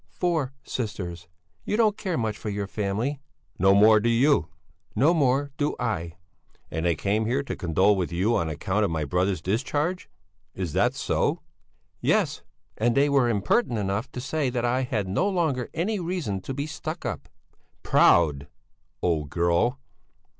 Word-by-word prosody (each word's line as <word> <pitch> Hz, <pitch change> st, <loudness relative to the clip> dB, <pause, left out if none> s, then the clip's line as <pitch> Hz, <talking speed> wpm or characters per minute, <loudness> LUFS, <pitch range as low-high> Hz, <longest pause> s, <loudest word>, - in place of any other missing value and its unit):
"Four 160 Hz, -7 st, -1 dB
sisters! 90 Hz, -8 st, -5 dB, 0.4 s
You 210 Hz, -, -1 dB
don't 215 Hz, -3 st, +3 dB
care 185 Hz, -6 st, -3 dB
much 110 Hz, -3 st, -1 dB
for 105 Hz, -, -6 dB
your 100 Hz, 0 st, -2 dB
family!" 110 Hz, +8 st, -2 dB, 0.4 s
"No 95 Hz, +2 st, +5 dB
more 110 Hz, +2 st, +7 dB
do 115 Hz, +3 st, +1 dB
you!" 120 Hz, -, +3 dB, 0.5 s
"No 145 Hz, +10 st, +4 dB
more 140 Hz, -2 st, +1 dB
do 145 Hz, 0 st, 0 dB
I!" 90 Hz, -9 st, -2 dB, 0.6 s
"And 80 Hz, +2 st, -1 dB
they 85 Hz, -, +2 dB
came 105 Hz, +2 st, 0 dB
here 130 Hz, +4 st, 0 dB
to -, -, -4 dB
condole 95 Hz, +3 st, +2 dB
with 90 Hz, -3 st, -2 dB
you 95 Hz, +7 st, +1 dB
on 85 Hz, -5 st, 0 dB
account 95 Hz, +7 st, -1 dB
of 100 Hz, -, +1 dB
my 80 Hz, -2 st, -2 dB
brother's 90 Hz, +2 st, 0 dB
discharge? 145 Hz, -, -1 dB, 0.5 s
Is 90 Hz, -5 st, -4 dB
that -, -, +2 dB
so?" -, -, 0 dB, 0.6 s
"Yes! -, -, +1 dB, 0.4 s
And 115 Hz, +2 st, +2 dB
they 145 Hz, +1 st, +4 dB
were 135 Hz, -4 st, +3 dB
impertinent 115 Hz, -, +1 dB
enough 100 Hz, +4 st, -2 dB
to 125 Hz, -, -5 dB
say 140 Hz, +1 st, -1 dB
that 120 Hz, -1 st, -1 dB
I 125 Hz, +2 st, +1 dB
had 120 Hz, -7 st, -2 dB
no 105 Hz, -, +1 dB
longer 160 Hz, -10 st, 0 dB
any 200 Hz, +5 st, -1 dB
reason 170 Hz, -, -3 dB
to 135 Hz, -, -5 dB
be 140 Hz, +1 st, -2 dB
stuck 155 Hz, +2 st, -6 dB
up...." -, -, -4 dB, 0.5 s
"Proud, 70 Hz, -2 st, +4 dB, 0.6 s
old 80 Hz, -4 st, 0 dB
girl!" 85 Hz, -, +1 dB
115 Hz, 165 wpm, -26 LUFS, 95-140 Hz, 0.6 s, more